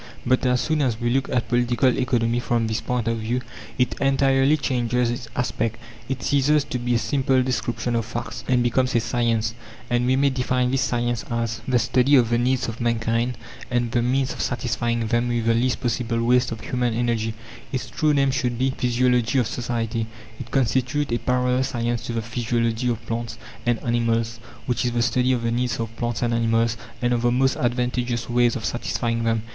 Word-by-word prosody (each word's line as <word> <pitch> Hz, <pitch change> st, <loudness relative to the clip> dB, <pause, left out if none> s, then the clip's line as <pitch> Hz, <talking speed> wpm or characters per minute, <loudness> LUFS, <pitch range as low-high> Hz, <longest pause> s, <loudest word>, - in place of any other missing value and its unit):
But 130 Hz, +1 st, +2 dB
as 125 Hz, 0 st, +2 dB
soon 155 Hz, -1 st, 0 dB
as 120 Hz, -5 st, 0 dB
we 120 Hz, -1 st, 0 dB
look 135 Hz, +2 st, 0 dB
at 125 Hz, -2 st, 0 dB
Political 120 Hz, +1 st, +2 dB
Economy 120 Hz, -2 st, +1 dB
from 120 Hz, -1 st, 0 dB
this 110 Hz, 0 st, -1 dB
point 125 Hz, -2 st, -2 dB
of 115 Hz, 0 st, 0 dB
view, 120 Hz, +3 st, -1 dB, 0.4 s
it 125 Hz, -1 st, +1 dB
entirely 135 Hz, +1 st, +3 dB
changes 125 Hz, -3 st, 0 dB
its 120 Hz, -1 st, -5 dB
aspect. 115 Hz, -3 st, -1 dB, 0.3 s
It 135 Hz, -1 st, -3 dB
ceases 145 Hz, +1 st, +3 dB
to 125 Hz, -, -1 dB
be 120 Hz, 0 st, 0 dB
a -, -, +4 dB
simple 130 Hz, +3 st, +1 dB
description 120 Hz, -1 st, -1 dB
of 115 Hz, -, +1 dB
facts, 115 Hz, +1 st, -6 dB
and 125 Hz, -1 st, +3 dB
becomes 125 Hz, +1 st, +1 dB
a -, -, +5 dB
science, 115 Hz, -1 st, 0 dB, 0.4 s
and 120 Hz, 0 st, +2 dB
we 130 Hz, -, +3 dB
may 140 Hz, +1 st, +3 dB
define 125 Hz, -1 st, 0 dB
this 135 Hz, 0 st, +1 dB
science 120 Hz, -2 st, 0 dB
as: 115 Hz, -1 st, -2 dB
"The 130 Hz, -1 st, +3 dB
study 125 Hz, +4 st, +3 dB
of 120 Hz, -3 st, +4 dB
the 120 Hz, -, +3 dB
needs 130 Hz, +1 st, +1 dB
of 115 Hz, 0 st, -6 dB
mankind, 115 Hz, +1 st, 0 dB, 0.3 s
and 120 Hz, -2 st, 0 dB
the 120 Hz, -, +2 dB
means 130 Hz, +2 st, +1 dB
of -, -, -6 dB
satisfying 120 Hz, -1 st, -1 dB
them 120 Hz, +2 st, +1 dB
with 120 Hz, -1 st, -1 dB
the 115 Hz, -, +4 dB
least 125 Hz, +2 st, +1 dB
possible 115 Hz, -1 st, -1 dB
waste 125 Hz, +1 st, +3 dB
of 115 Hz, -, -5 dB
human 125 Hz, -2 st, -1 dB
energy". 115 Hz, -2 st, 0 dB, 0.4 s
Its 130 Hz, -2 st, -3 dB
true 155 Hz, -1 st, +1 dB
name 140 Hz, -2 st, +3 dB
should 125 Hz, -2 st, -1 dB
be, 130 Hz, +2 st, +1 dB
Physiology 125 Hz, 0 st, +1 dB
of 125 Hz, -, +3 dB
Society. 115 Hz, -1 st, -2 dB, 0.3 s
It 115 Hz, -, -7 dB
constitutes 130 Hz, +3 st, 0 dB
a 120 Hz, -, +1 dB
parallel 125 Hz, 0 st, +1 dB
science 120 Hz, -3 st, -1 dB
to 120 Hz, -, -3 dB
the 115 Hz, -1 st, -2 dB
physiology 115 Hz, +1 st, -1 dB
of 115 Hz, -1 st, -3 dB
plants 115 Hz, 0 st, -4 dB, 0.3 s
and 120 Hz, -1 st, +3 dB
animals, 115 Hz, -1 st, 0 dB, 0.3 s
which 125 Hz, -2 st, 0 dB
is 120 Hz, -1 st, 0 dB
the 120 Hz, -1 st, +1 dB
study 125 Hz, +2 st, +2 dB
of 125 Hz, -2 st, 0 dB
the 115 Hz, -, 0 dB
needs 125 Hz, +1 st, -1 dB
of 115 Hz, 0 st, -4 dB
plants 120 Hz, 0 st, -2 dB
and 120 Hz, -1 st, +1 dB
animals, 115 Hz, 0 st, +2 dB, 0.3 s
and 120 Hz, 0 st, +2 dB
of 120 Hz, -, 0 dB
the 120 Hz, 0 st, +2 dB
most 130 Hz, +2 st, +2 dB
advantageous 120 Hz, -1 st, -1 dB
ways 120 Hz, 0 st, +2 dB
of 115 Hz, -4 st, -4 dB
satisfying 115 Hz, -1 st, -1 dB
them. 115 Hz, -1 st, +1 dB
120 Hz, 205 wpm, -23 LUFS, 115-125 Hz, 0.4 s, a